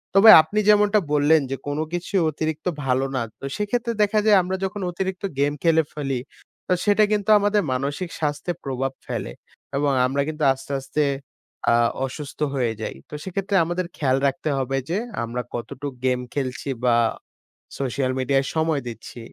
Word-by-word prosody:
তবে 205 +3 +8
আপনি 205 +7 -2
যেমনটা 210 0 +5
বললেন 150 +2 +4
যে, - - 0
কোনো 145 +2 -1
কিছু 175 +3 -3 0.2
অতিরিক্ত 155 +1 -3 0.2
ভালো। 130 +1 +1
না 130 - 0 0.2
তো 135 - -7
সেক্ষেত্রে 235 +3 -1
দেখা 210 +1 +2
যায় 210 -2 +6
আমরা 185 +2 -2
যখন 205 +2 -4
অতিরিক্ত 190 +2 -4 0.2
গেম 145 +1 +2
খেলে 160 -1 +4
ফেলি 135 -4 -2 0.5
তো 185 - +4
সেটা 205 +1 +4
কিন্তু 205 -1 0
আমাদের 205 0 +2
মানসিক 145 +7 -2
স্বাস্থ্যের 150 +3 -2
প্রভাব 135 0 -2 0.2
ফেলে - - -4 0.5
এবং 145 0 +2 0.2
আমরা 140 +2 0
কিন্তু 155 0 -4
আস্তে, 135 +1 -10
আস্তে, 150 +3 -1 0.7
আ - - +5 0.3
অসুস্থ 140 +2 -8 0.2
হয়ে 120 -4 0
যাই 110 - -4
তো - - -14
সেক্ষেত্রে 195 +1 -2
আমাদের 175 +2 -2
খেয়াল 130 -3 +2
রাখতে 155 +2 -2
হবে 135 0 -1
যে, 175 - 0 0.3
আমরা 120 +2 -3
কতটুক 130 +4 -5
গেম 125 -1 +2
খেলছি 135 0 -3 0.2
বা 120 -1 +4 0.8
সোশ্যাল 130 -1 -1
মিডিয়ায় 135 +1 +1
সময় 160 -2 +1
দিচ্ছি। 115 +1 -8
150 Hz, 165 wpm, -23 LUFS, 135-190 Hz, 0.8 s, তবে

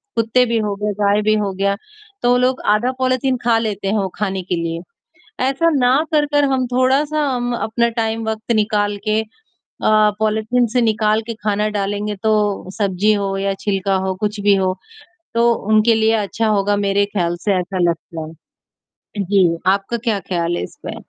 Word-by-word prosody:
कुत्ते 230 +2 +3
भी 230 0 0
हो 210 -2 -2
गए, 210 +1 -2
गाय 205 +1 +3
भी 215 +1 +3
हो 205 -2 -1
गया, 200 +1 0 0.5
तो 245 0 +4
लोग 255 +1 +1
आधा 240 +4 0
पॉलिथीन 255 0 +1
ख़ा 230 -1 +3
लेते 210 -3 -3
हैं 205 +3 +1
वो 195 - 0
ख़ाने 195 -2 -1
के 180 0 -2
लिए। 165 0 -3 0.7
ऐसा 275 +6 +2
ना 250 -1 +3 0.2
कर-कर 295 -1 +3
हम 255 -1 +1
थोड़ा-सा 280 +4 +2
अम, 245 0 -2
अपना 235 +1 0
टाइम 225 0 -2
वक़्त 220 +1 -4
निकाल 210 -1 +1
के 215 +1 +2 0.6
अ, - - 0 0.3
पॉलिथीन 220 +3 +1
से 250 - +4
निकाल 215 -1 +2
के 230 - -3
ख़ाना 210 0 +1
डालेंगे, 205 0 -2
तो 210 -2 0
सब्ज़ी 200 0 +2
हो 200 -1 -2
या 195 0 -1
छिलका 195 -1 0
हो, 190 - -1
कुछ 210 0 -2
भी 205 0 +4
हो, 190 -1 +1 0.6
तो 235 0 +4 0.2
उनके 215 +2 +5
लिए 220 0 +2
अच्छा 220 +2 -1
होगा, 205 -1 +1
मेरे 200 0 +1
ख्याल 175 -4 -1
से 205 - +2
ऐसा 185 +1 -3
लगता 165 -1 -6
है। 160 0 -16 0.7
जी, 190 -1 +3 0.2
आपका 195 +4 +1
क्या 210 -3 +1
ख्याल 175 -2 -2
है - - -3
इस - - -9
पे? - - -4
210 Hz, 180 wpm, -19 LUFS, 195-230 Hz, 0.7 s, उनके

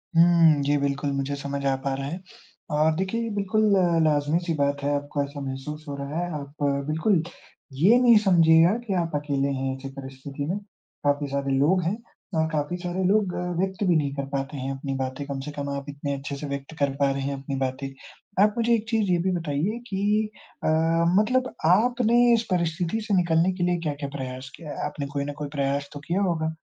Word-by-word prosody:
हुँ। 165 -3 +6
जी 145 +1 +2
बिल्कुल, 140 0 -1
मुझे 140 +1 -2
समझ 140 0 -4
आ 135 - +3
पा 135 -1 0
रहा 135 0 -4
है 170 +6 -4 0.6
और 155 +1 +3
देखिए, 190 +6 -1
ये 230 - -2
बिल्कुल 210 +2 +1 0.4
लाज़मी-सी 155 +3 +1
बात 140 -1 0
है, 145 - +1
आपको 145 0 -2
ऐसा 140 0 -7
महसूस 140 +3 -6
हो 140 - -4
रहा 140 +3 -4
है। 175 0 -2
आप 140 +1 -8 0.2
बिल्कुल 160 +3 +2 0.5
ये 185 - +5
नहीं 235 -2 +7
समझिएगा 165 -1 +6
कि 205 - -1
आप 165 - -3
अकेले 140 -2 0
हैं 130 0 -2
ऐसे 135 +1 -7
परिस्थिति 135 +1 -6
में, 185 +6 -1 0.5
काफ़ी 145 0 +1
सारे 140 -1 0
लोग 175 +7 +3
हैं 185 +6 -1 0.4
अ, 160 - +2
काफ़ी 150 +3 -1
सारे 180 +1 -3
लोग 200 -2 +2
अ, - - -2 0.2
व्यक्त 190 +1 -1
भी 175 - +4
नहीं 140 -3 +1
कर 140 - -3
पाते 140 +1 -3
हैं 135 +1 -3
अपनी 135 0 -4
बातें। 130 +1 -3
कम 140 -1 -4
से 150 +2 -6
कम 145 -1 -4
आप 140 0 -4
इतने 140 0 -4
अच्छे 140 +1 -5
से 145 +1 -6
व्यक्त 140 +2 -5
कर 140 -1 +3
पा 140 -1 +3
रहे 135 0 -2
हैं 140 +1 -1
अपनी 135 0 -4
बातें। 130 +1 -2 0.6
आप 210 0 +3
मुझे 235 0 +3
एक 225 -1 -3
चीज़ 220 -5 +1
ये 175 - +4
भी - - +2
बताइए 165 +7 -1
कि 210 +1 +1 0.3
अ, - - 0 0.5
मतलब 255 +4 +1
आपने 235 +5 +4
इस 230 - +3
परिस्थिति 175 +4 0
से 210 -1 -2
निकलने 170 +1 +3
के 175 - -1
लिए 175 0 +2
क्या-क्या 145 -3 -3
प्रयास 130 0 -6
किया 160 - -10
है? - - -4
आपने 140 - -4
कोई 140 - -1
न 145 - -4
कोई 150 -1 -4
प्रयास 140 +1 0
तो 145 - -7
किया 185 +4 +1
होगा, 160 -4 0
150 Hz, 210 wpm, -25 LUFS, 140-180 Hz, 0.6 s, नहीं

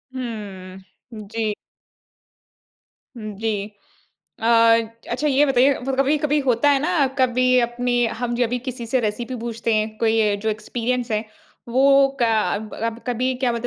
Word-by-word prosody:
हम्म, 200 -6 -7 0.4
जी। 220 +1 -2 1.6
उम, 215 -2 -6
जी। 210 -1 -3 0.7
अ - - 0 0.6
अच्छा 300 - -1
ये 280 +1 +4
बताइए 270 0 +4 0.3
कभी-कभी 295 +2 +2
होता 250 +3 +3
है 280 - +4
ना, 310 -2 +2
कभी 255 0 +3
अपनी 240 0 0 0.2
हम 240 -1 -1
जब 245 -1 +1
भी 250 - -1
किसी 250 -1 -6
से 255 +3 +1
रेसिपी 235 +3 -3
पूछते 230 -1 -2
हैं 215 0 -1
कोई 220 -2 +2
जो 220 - -1
एक्सपीरियंस 240 +3 -3
है 215 0 0 0.4
वो 275 +3 +5
क - - +3 0.3
अब 215 +1 -6
अब 230 0 -2
कभी 250 +1 0
क्या 255 -1 0
बोलते 235 +1 -3
240 Hz, 145 wpm, -22 LUFS, 220-255 Hz, 1.6 s, वो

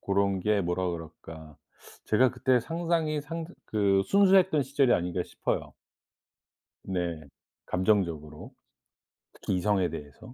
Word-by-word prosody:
고런 100 -1 0
게 105 +1 +1
뭐라 90 +1 -1
그럴까. 80 -2 -9 0.5
제가 125 +4 +4
그때 125 0 +2
상당히 165 +1 -1
상 165 +2 -5 0.2
그 100 -2 +2
순수했던 190 -6 +4
시절이 135 -2 +2
아닌가 90 +1 -1
싶어요. - - -3 1.1
네. 85 -4 -3 0.4
감정적으로. 85 -6 -1 0.8
특히 - - -3
이성에 95 -1 +1
대해서. 75 - -10
100 Hz, 255 characters per minute, -28 LUFS, 85-140 Hz, 1.1 s, 제가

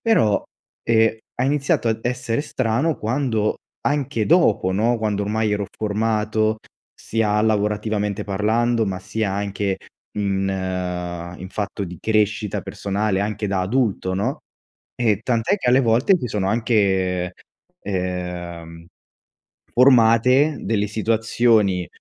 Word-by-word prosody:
però, 110 - +3 0.4
e 115 -1 +2 0.2
ha 125 - 0
iniziato 140 -3 +1
a 110 - 0
essere 125 0 -1
strano 135 +2 0
quando 110 -2 0 0.3
anche 135 -7 0
dopo, 150 - +3
no, 115 +5 +2
quando 105 -2 -1
ormai 105 +1 0
ero 105 -1 -1
formato, 110 0 0 0.4
sia 105 -2 0
lavorativamente 105 -1 0
parlando, 110 +3 +1
ma 95 -1 -3
sia 105 0 -2
anche 100 -1 -2 0.4
in 95 -1 0 0.9
in 95 - -8
fatto 100 0 -4
di 90 -1 -8
crescita 105 -1 0
personale, 100 0 -2
anche 105 +1 -2
da 95 -1 0
adulto, 100 -4 0
no, 115 +8 -1 0.6
e 110 -5 +1
tant'è 115 - +1
che 125 - 0
alle 130 +2 +5
volte 120 - +3
si - - -4
sono 105 -3 -1
anche 95 -6 +1 0.5
ehm, 100 -1 -4
ehm, 90 -2 -5 0.9
formate 125 +3 +5
delle 105 0 0
situazioni 110 -3 +1
110 Hz, 120 wpm, -21 LUFS, 100-115 Hz, 0.9 s, alle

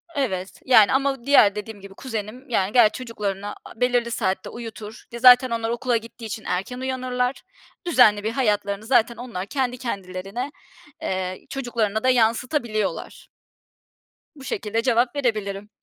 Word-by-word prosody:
Evet, 195 -9 -3
yani, 225 -4 +6
ama 270 -2 0
diğer 220 -8 +6
dediğim 210 0 -7
gibi 195 0 -11
kuzenim, 235 +3 -6
yani, 195 -4 +1
ger 235 -4 +6
çocuklarına 205 -5 -4
a 225 - -13
belirli 245 -1 +2
saatte 190 -4 -1
uyutur. 225 -1 -9
Di 235 - -6
zaten 250 +1 +8
onlar 230 -1 -2
okula 240 +1 0
gittiği 230 +1 -10
için 215 0 -6
erken 195 +8 -3
uyanırlar. 255 0 -2 0.4
Düzenli 245 -11 +5
bir 220 - -1
hayatlarını 210 -4 0
zaten 235 -1 +3
onlar 235 -7 -5
kendi 250 +1 -2
kendilerine, 200 +2 -5 0.5
eee, 185 -1 -3
çocuklarına 235 -5 -2
da 255 - +4
yansıtabiliyorlar. 235 -2 0 1.1
Bu 275 -3 -13
şekilde 225 -3 -2
cevap 240 +2 +2
verebilirim. 210 -6 -2
230 Hz, 140 wpm, -23 LUFS, 205-250 Hz, 1.1 s, zaten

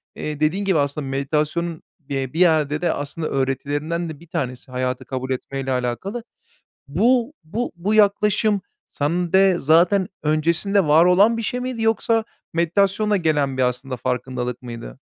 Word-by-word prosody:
eee, 150 -1 -5
dediğin 175 +7 +1
gibi 190 -4 +2
aslında 140 0 -1
meditasyonun, 150 +5 -1 0.3
eee, 135 -2 -3
bir 165 - -3
yerde 155 -3 +3
de 175 - +1
aslında 150 +3 -4
öğretilerinden 145 +5 -2
de 150 - -8
bir 170 - -16
tanesi, 130 -7 -4
hayatı 130 0 -2
kabul 130 +1 -4
etmeyle 135 +1 -3
alakalı. 130 - -2 0.6
Bu, 235 - +2
bu, 220 +10 -3
bu 190 +5 -1
yaklaşım 210 0 +3 0.3
sende 175 +4 +2
zaten 175 +6 +4 0.2
öncesinde 170 +6 +2
var 155 +3 +6
olan 200 +6 +5
bir 230 - -2
şey 245 +3 -2
miydi 250 -2 -4
yoksa 225 0 +2 0.3
meditasyonla 200 +5 +2
gelen 145 -6 0
bir 130 - +2
aslında 125 +1 -2
farkındalık 125 0 -3
mıydı? 115 - -8
160 Hz, 145 wpm, -22 LUFS, 135-195 Hz, 0.6 s, var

